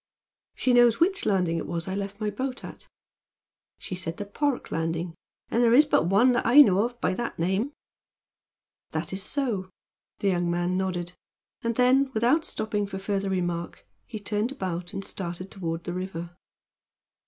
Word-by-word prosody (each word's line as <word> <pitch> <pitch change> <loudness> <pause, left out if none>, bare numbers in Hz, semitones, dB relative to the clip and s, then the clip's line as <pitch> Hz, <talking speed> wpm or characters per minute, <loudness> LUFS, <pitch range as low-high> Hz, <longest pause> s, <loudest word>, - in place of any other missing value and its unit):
"She 255 - +1
knows 240 -2 +5
which 385 +4 +2
landing 180 -5 +2
it - - -4
was 170 0 -3
that 190 - -4
I - - -2
left 200 0 -4
my 210 -1 -1
boat 260 +4 -4
at?" - - -10 0.9
"She - - -7
said 175 -2 -4
the 205 - -4
Park 280 +6 -2
landing, 165 +1 -2 0.4
and 235 - +2
there 235 0 +5
is 295 +4 +7
but 230 - +2
one 205 +8 +5
that 245 - +1
I 255 +6 +8
know 200 -6 +5
of 240 0 -6
by 185 - +1
that 235 +5 -4
name." 190 - 0 1.2
"That 160 +2 -3
is 190 - -1
so," 210 -5 -1 0.5
the 200 - +1
young 175 -2 +1
man 175 +1 0
nodded, 180 -2 -2 0.5
and 230 0 -1
then, 260 +3 +4
without 250 +9 +3
stopping 210 - -2
for 190 -1 -5
further 195 0 -2
remark, 175 -2 -3 0.2
he 220 - -6
turned 210 +3 0
about 180 -8 -4
and 195 -1 -5
started 185 0 -6
toward 165 -3 -4
the 175 - -4
river. 175 -2 -5
195 Hz, 175 wpm, -26 LUFS, 175-240 Hz, 1.2 s, I